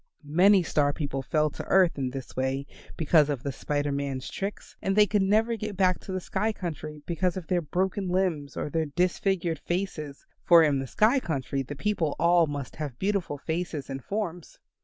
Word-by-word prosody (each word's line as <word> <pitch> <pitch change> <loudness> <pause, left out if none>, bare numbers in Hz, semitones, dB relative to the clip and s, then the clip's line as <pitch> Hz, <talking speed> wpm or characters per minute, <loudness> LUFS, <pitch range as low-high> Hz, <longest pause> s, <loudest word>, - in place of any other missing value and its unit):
Many 180 +6 +5
Star 145 -3 +1
people 140 -3 -3
fell 150 +3 +1
to - - -7
earth 185 -3 +4
in 135 -2 -2
this 130 -1 -8
way 130 +1 -1 0.3
because 155 -2 +4
of 140 -4 -2
the 140 - -2
Spider 145 +1 -2
Man's 140 -2 -3
tricks, 195 +1 -5
and 195 - 0
they 210 0 +7
could 210 0 +1
never 220 +4 +2
get 215 -3 -5
back 185 -2 +3
to - - -8
the 185 - -1
sky 200 +4 -1
country 155 -6 -6
because 180 +2 -1
of 185 - -5
their 175 +1 +1
broken 185 +4 -1
limbs 175 -7 -1
or - - -2
their 160 0 0
disfigured 175 0 0
faces, 160 -5 -4 0.2
for 170 -2 +7
in 145 -3 +2
the 135 - -4
sky 225 - +3
country 140 - -2
the 140 +2 -6
people 165 -3 -1
all 170 -1 +4
must 145 -3 -6
have 145 -6 -5
beautiful 195 -5 -1
faces 160 -2 -4
and 135 -1 -5
forms. 180 - -4
165 Hz, 195 wpm, -27 LUFS, 145-190 Hz, 0.3 s, they